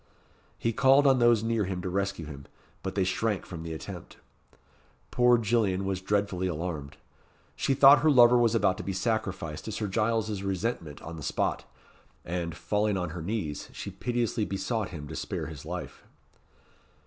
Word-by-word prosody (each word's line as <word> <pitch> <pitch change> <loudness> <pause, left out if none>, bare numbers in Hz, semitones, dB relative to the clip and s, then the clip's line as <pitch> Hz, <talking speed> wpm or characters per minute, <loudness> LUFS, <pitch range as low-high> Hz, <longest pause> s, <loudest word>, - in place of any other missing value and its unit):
He 115 - -1
called 135 +4 +5
on 135 -2 +5
those 120 -2 +4
near 115 -2 0
him 95 -1 -3
to - - -3
rescue 95 -3 -2
him, 70 -2 -10 0.3
but 95 - -5
they 100 - +2
shrank 105 +2 -1
from 85 -3 -7
the 80 0 -6
attempt. 80 - -8 0.9
Poor 125 0 +5
Gillian 105 -4 +1
was 95 -1 -2
dreadfully 100 -2 0
alarmed. 80 -4 -4 0.6
She 135 - 0
thought 140 +1 +8
her 155 - +3
lover 125 -3 +7
was 120 -1 +3
about 95 -4 +2
to - - -6
be 95 - -3
sacrificed 95 -7 -2
to 110 - -4
Sir 105 0 -3
Giles's 110 0 0
resentment 95 -6 -3
on 85 0 -7
the - - -8
spot; - - -1 0.6
and, 85 -1 -3
falling 105 +4 0
on 90 -3 -3
her 85 0 -6
knees, 85 -5 -3
she - - -6
piteously 120 -2 -1
besought 100 +2 -2
him 75 -5 -8
to 80 - -7
spare - - -4
his 80 -4 -9
life. - - -6
100 Hz, 170 wpm, -28 LUFS, 90-115 Hz, 0.9 s, thought